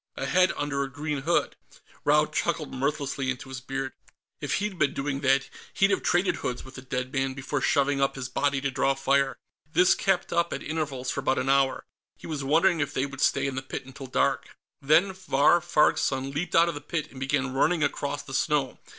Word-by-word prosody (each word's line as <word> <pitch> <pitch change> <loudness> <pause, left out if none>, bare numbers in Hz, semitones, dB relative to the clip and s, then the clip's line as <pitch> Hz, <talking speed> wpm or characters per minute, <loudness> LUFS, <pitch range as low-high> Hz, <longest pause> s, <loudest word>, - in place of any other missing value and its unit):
A 135 - -2
head 185 +6 +3
under 145 -1 -1
a 135 - -2
green 150 +1 -3
hood. 170 +5 +1 0.5
Raud 150 +1 +3
chuckled 160 -2 -1
mirthlessly 140 0 -2
into 130 0 -4
his 130 -1 -6
beard. 135 0 -4 0.5
If - - -1
he'd 195 -2 -3
been 140 - +2
doing 135 0 -2
that, 135 0 +2 0.3
he'd 195 +1 +3
have 195 - +1
traded 180 +2 +1
hoods 125 0 -4
with 130 - -12
the 130 - -9
dead 130 0 -4
man 135 -1 -1
before 135 +1 -3
shoving 140 0 +2
up 135 - +1
his 130 -2 -4
body 140 +1 0
to 140 0 -1
draw 135 +1 +1
fire. 135 0 +1 0.3
This 175 +3 +5
kept 195 -2 0
up, 170 0 +1
at - - -5
intervals, 140 -5 -3
for - - -3
about 135 0 +1
an 135 - -1
hour. 135 -1 +2 0.3
He - - -13
was 150 -4 -4
wondering 165 +5 +3
if 145 - -2
they 130 - +1
would 140 0 -7
stay 135 - +2
in 135 - -2
the 130 - -3
pit 130 0 -6
until 135 +1 -9
dark. 130 - 0 0.2
Then 160 +7 +4
Vahr 175 -3 +3
Farg's 155 -3 +3
son 135 0 -1
leaped 150 +6 -3
out 165 +1 +6
of 170 - -1
the 145 - -7
pit 155 +1 -4
and 130 - -11
began 135 -1 -1
running 155 +4 +2
across 145 0 -2
the 135 - -10
snow. 135 -1 0
140 Hz, 220 wpm, -27 LUFS, 135-155 Hz, 0.5 s, out